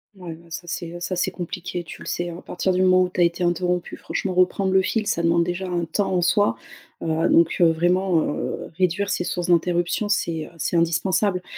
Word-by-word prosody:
Ouais 180 -4 -8
bah, 170 +1 -15
ça 165 - -6
c'est, 170 -1 -5
heu 175 - -7
ça 185 +2 -3
c'est 180 - 0
compliqué, 175 0 -5
tu - - -11
le - - -9
sais 175 0 -2
hein. 170 - -7
À - - -12
partir 185 +1 -2
du 185 - +1
moment 185 0 +5
où 180 - -1
tu 180 - -6
as - - +7
été 170 +1 +1
interrompu, 175 0 -1
franchement 190 -2 -3
reprendre 185 +1 +2
le 190 0 +5
fil, 215 +2 -1
ça 185 -5 0
demande 170 0 +3
déjà 175 +2 -3
un 175 -2 -1
temps 195 +4 -1
en 180 - +2
soi, 205 +5 +3 0.5
heu. 160 +1 +1
Donc, 165 0 +4
heu, - - +7
vraiment, 175 +1 +2
heu, - - -4
réduire 185 +2 +1
ces - - 0
sources 175 0 -3
d'interruption, 175 +4 +1
c'est, 165 -6 0
heu, - - -13
c'est 170 - -2
indispensable, 180 +3 +1
175 Hz, 235 wpm, -23 LUFS, 170-185 Hz, 0.5 s, as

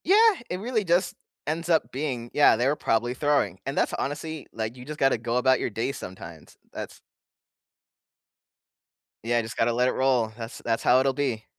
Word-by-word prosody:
Yeah, 380 - +5 0.3
it 180 - -3
really 225 +1 -1
just 175 0 +1 0.3
ends 165 +3 -2
up 160 -3 +2
being, 130 -4 -4
"Yeah, 145 - +6
they 120 +3 +1
were 145 - +2
probably 120 -2 0
throwing." 130 - +1
And 135 - -4
that's - - +1
honestly, 155 +2 -4
like, 110 +1 -4
you 125 -1 -11
just 150 +1 -7
gotta 135 -2 +3
go 115 +2 -2
about 130 0 +3
your - - -1
day 115 +5 -2
sometimes. 85 - -10 0.2
That's - - -7 2.2
Yeah, 120 +1 +1
just 115 0 -7
gotta 115 +1 +2
let 125 +2 +2
it - - +2
roll. 125 -4 +1
That's 115 0 -7
that's 115 -1 0
how 125 - +5
it'll 135 0 +2
be. 130 -6 -2
130 Hz, 185 wpm, -26 LUFS, 115-145 Hz, 2.2 s, Yeah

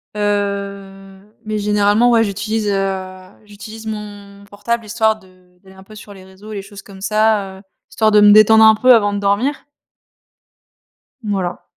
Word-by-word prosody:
Heu, 200 -1 -4 0.3
mais 215 0 -3
généralement, 210 +3 +2
ouais, 230 -1 +3
j'utilise, 210 +1 -3
heu, 190 -1 -3 0.3
j'utilise 215 +2 -11
mon 205 -2 -9
portable 210 +3 -4
histoire 220 0 0
de, 200 -3 -21
heu, 180 -1 -27
d'aller 190 0 -18
un 190 - -15
peu 215 +2 -16
sur 205 -1 -13
les 190 -1 -15
réseaux 190 +3 -14
et - - -7
les 200 - -5
choses 200 0 -13
comme 195 -1 -14
ça, 215 -2 0
heu, - - -15 0.3
histoire 220 -1 0
de 210 0 +5
me 205 0 +7
détendre 215 +1 +6
un 220 0 +6
peu 255 +4 +4
avant 205 -3 +2
de 200 - -3
dormir. 205 +8 -1 1.6
Voilà. 195 -4 -4
205 Hz, 175 wpm, -17 LUFS, 195-215 Hz, 1.6 s, me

